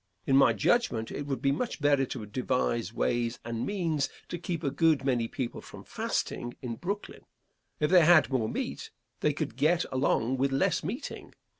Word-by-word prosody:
In 135 Hz, -, +3 dB
my 135 Hz, -3 st, +6 dB
judgment, 115 Hz, -, +1 dB
it 145 Hz, -, -5 dB
would 135 Hz, -4 st, -3 dB
be 135 Hz, -, +3 dB
much 235 Hz, -, -2 dB
better 145 Hz, -2 st, +3 dB
to 115 Hz, -5 st, -5 dB
devise 120 Hz, -2 st, -1 dB
ways 120 Hz, 0 st, 0 dB
and 115 Hz, 0 st, -3 dB
means 165 Hz, -9 st, 0 dB, 0.2 s
to 175 Hz, -, -4 dB
keep 170 Hz, -1 st, -4 dB
a 140 Hz, -, 0 dB
good 155 Hz, -1 st, +2 dB
many 120 Hz, -4 st, +1 dB
people 125 Hz, 0 st, -4 dB
from -, -, -11 dB
fasting 120 Hz, 0 st, -3 dB
in 115 Hz, -3 st, -5 dB
Brooklyn. 200 Hz, -, -5 dB, 0.6 s
If 150 Hz, +1 st, +1 dB
they 180 Hz, -3 st, +7 dB
had 155 Hz, -2 st, +6 dB
more 115 Hz, -5 st, +1 dB
meat, -, -, -4 dB, 0.3 s
they -, -, +2 dB
could -, -, -4 dB
get 160 Hz, +6 st, +2 dB
along 130 Hz, -1 st, +1 dB
with 135 Hz, +1 st, +1 dB
less 135 Hz, -, +1 dB
meeting. 215 Hz, -, -6 dB
135 Hz, 180 wpm, -29 LUFS, 120-160 Hz, 0.6 s, they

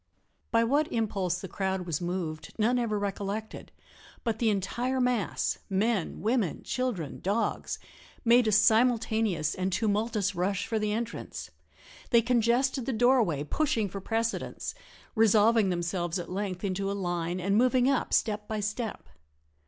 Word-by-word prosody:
By 230 Hz, 0 st, +3 dB
what 285 Hz, +6 st, +1 dB
impulse 195 Hz, -5 st, -1 dB
the 190 Hz, -, -5 dB
crowd 190 Hz, -1 st, -2 dB
was 170 Hz, -2 st, -2 dB
moved 175 Hz, -3 st, -4 dB
none 235 Hz, +3 st, +2 dB
ever 220 Hz, -3 st, 0 dB
recollected, 205 Hz, +2 st, -4 dB, 0.5 s
but 225 Hz, -2 st, -1 dB
the 230 Hz, -, +3 dB
entire 240 Hz, +6 st, -1 dB
mass 250 Hz, -4 st, 0 dB
men, 200 Hz, -1 st, 0 dB
women, 220 Hz, -, 0 dB
children, 230 Hz, -, -3 dB
dogs 205 Hz, +4 st, -1 dB, 0.5 s
made 235 Hz, 0 st, +5 dB
a -, -, +3 dB
simultaneous 220 Hz, -5 st, +3 dB
and 185 Hz, +1 st, -2 dB
tumultuous 210 Hz, 0 st, 0 dB
rush 185 Hz, +2 st, -1 dB
for 225 Hz, -, -1 dB
the 210 Hz, 0 st, 0 dB
entrance. 230 Hz, +2 st, -4 dB, 0.6 s
They 235 Hz, -2 st, +5 dB
congested 245 Hz, +2 st, +2 dB
the 265 Hz, -, 0 dB
doorway, 225 Hz, -, +3 dB
pushing 270 Hz, -, 0 dB
for 195 Hz, +2 st, -6 dB
precedence 225 Hz, +3 st, -2 dB, 0.4 s
resolving 220 Hz, -1 st, +4 dB
themselves 175 Hz, 0 st, -1 dB
at 175 Hz, -1 st, -6 dB
length 190 Hz, -2 st, -3 dB
into 195 Hz, 0 st, -1 dB
a -, -, -1 dB
line 175 Hz, -1 st, -2 dB
and 195 Hz, +2 st, +1 dB
moving 250 Hz, +2 st, +4 dB
up 275 Hz, -1 st, +1 dB
step 210 Hz, -1 st, +1 dB
by 215 Hz, -1 st, -2 dB
step. 210 Hz, +2 st, -3 dB
215 Hz, 145 wpm, -29 LUFS, 190-235 Hz, 0.6 s, made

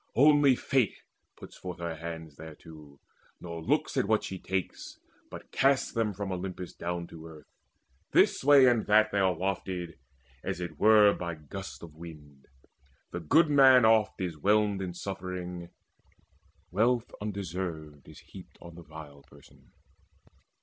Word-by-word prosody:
Only 145 Hz, -1 st, +5 dB
Fate 125 Hz, -3 st, 0 dB, 0.4 s
puts -, -, -13 dB
forth 90 Hz, -1 st, -8 dB
Her 85 Hz, -1 st, -4 dB
hands 80 Hz, -2 st, -8 dB
thereto, 75 Hz, -2 st, -13 dB, 0.4 s
nor 85 Hz, -1 st, -7 dB
looks -, -, 0 dB
at -, -, +2 dB
what 110 Hz, 0 st, +2 dB
she 95 Hz, -, -6 dB
takes, 95 Hz, 0 st, -5 dB, 0.3 s
But -, -, -11 dB
casts 135 Hz, 0 st, +2 dB
them 115 Hz, -2 st, 0 dB
from 100 Hz, 0 st, -4 dB
Olympus 90 Hz, -1 st, -6 dB
down 85 Hz, 0 st, -4 dB
to 80 Hz, 0 st, -11 dB
earth. 80 Hz, -2 st, -13 dB, 0.6 s
This -, -, +3 dB
way 140 Hz, -1 st, +7 dB
and 120 Hz, -3 st, +2 dB
that 110 Hz, +1 st, +4 dB
they 100 Hz, -, 0 dB
are 95 Hz, -2 st, +2 dB
wafted, 90 Hz, -3 st, -4 dB, 0.4 s
as -, -, -4 dB
it 90 Hz, -1 st, -7 dB
were 105 Hz, -1 st, +6 dB
By 85 Hz, -1 st, -5 dB
gusts 95 Hz, +6 st, -9 dB
of 80 Hz, -2 st, -11 dB
wind. 75 Hz, -4 st, -13 dB, 0.6 s
The 85 Hz, -, -4 dB
good 150 Hz, -, +3 dB
man 130 Hz, -4 st, +7 dB
oft 110 Hz, -2 st, +3 dB
is 85 Hz, -5 st, -4 dB
whelmed 105 Hz, +2 st, +2 dB
In 90 Hz, -2 st, -5 dB
suffering: 90 Hz, -2 st, -6 dB, 1.0 s
wealth 115 Hz, +5 st, +1 dB
undeserved 90 Hz, -7 st, -6 dB
is -, -, -14 dB
heaped -, -, -14 dB
On 85 Hz, -, -12 dB
the 85 Hz, -, -12 dB
vile 75 Hz, -2 st, -12 dB
person. -, -, -20 dB
90 Hz, 150 wpm, -29 LUFS, 80-105 Hz, 1.0 s, way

